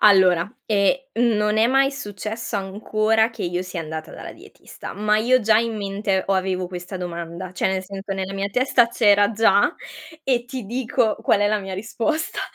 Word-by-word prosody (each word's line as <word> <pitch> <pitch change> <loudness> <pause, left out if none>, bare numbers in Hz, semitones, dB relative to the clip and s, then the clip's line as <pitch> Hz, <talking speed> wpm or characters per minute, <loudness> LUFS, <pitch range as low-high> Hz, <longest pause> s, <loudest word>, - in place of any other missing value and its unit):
Allora, 185 -4 +5 0.2
ehm, 205 +4 +3 0.4
non 210 0 +1
è 220 +1 +4
mai 270 +2 +3
successo 215 -3 -5
ancora 215 +3 +1
che 225 - -8
io 175 +1 -2
sia 185 -2 -5
andata 160 0 -6
dalla - - -8
dietista, - - -11
ma 210 +1 +1
io 245 +4 +3
ho - - -6
già 215 0 +4
in 230 0 0
mente, 195 -1 -1
o 195 - +2
avevo 185 -1 -1
questa 180 +1 -7
domanda, 170 +1 -6
cioè 180 - -1
nel 190 0 -1
senso, 195 +1 -6
nella 190 0 -4
mia 195 +1 -2
testa 250 0 +3
c'era 205 -3 +4
già 220 - +3 0.5
e 250 -3 0
ti 250 -4 -7
dico 235 -2 0
qual 205 - +3
è 205 - +3
la 215 0 +1
mia 190 -1 -7
risposta, 230 +10 -2
205 Hz, 185 wpm, -22 LUFS, 190-225 Hz, 0.5 s, Allora